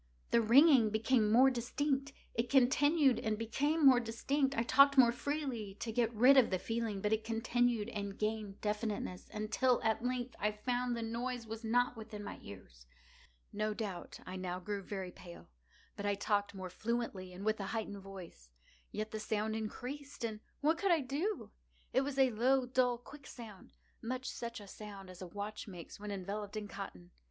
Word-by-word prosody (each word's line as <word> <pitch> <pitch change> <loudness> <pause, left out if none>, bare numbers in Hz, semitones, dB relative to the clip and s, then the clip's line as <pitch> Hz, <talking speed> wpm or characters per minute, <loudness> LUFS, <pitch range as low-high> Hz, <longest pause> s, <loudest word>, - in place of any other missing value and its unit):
The 235 - +5
ringing 250 0 +7
became 220 0 +2
more 260 +4 +7
distinct:—it 265 -1 -2
continued 275 +2 +4
and 220 -1 -1
became 285 +8 +1
more 260 -2 +8
distinct: 270 +4 0
I 230 - +3
talked 275 +3 +6
more 245 -3 +8
freely 245 -6 -3
to 225 - -4
get 230 0 +1
rid 250 +5 +6
of 255 - +6
the 185 - +1
feeling: 225 0 -2
but 210 +2 +1
it 220 0 0
continued 230 0 +1
and 200 -3 -5
gained 215 -2 -2
definiteness—until, 215 +3 -1
at 220 +1 +1
length, 250 0 -2
I 210 0 +1
found 245 +3 -1
that 230 - -3
the - - -3
noise 240 +1 -3
was 225 +1 -7
not 245 +2 +2
within 215 -2 -8
my - - -7
ears. - - -12 0.7
No 215 +1 -1
doubt 200 -6 -5
I 185 +1 -6
now 180 -1 -3
grew 200 +2 -4
very 190 -2 -5
pale;—but 170 - -12
I 205 - +2
talked 205 0 0
more 185 -1 -6
fluently, 215 -4 -3
and 185 +3 -8
with 215 0 +1
a 195 - -3
heightened 215 -3 -3
voice. 185 - -11 0.4
Yet 215 0 -4
the 215 - -4
sound 215 0 -1
increased—and 245 +1 -5 0.2
what 320 +3 +2
could 395 - +1
I 330 -3 +4
do? 295 +11 -2 0.4
It 260 - +4
was 275 0 -3
a 265 -2 +5
low, 255 +4 +3
dull, 250 -1 +2
quick 275 +4 -13
sound—much 235 +3 -8
such 235 -1 -5
a 205 - -10
sound 195 -2 -9
as 180 - -12
a 185 - -5
watch 205 +4 -6
makes 180 -2 -9
when 210 0 -6
enveloped 205 +2 -4
in 210 -1 -4
cotton. 90 - -8
225 Hz, 175 wpm, -34 LUFS, 205-250 Hz, 0.7 s, more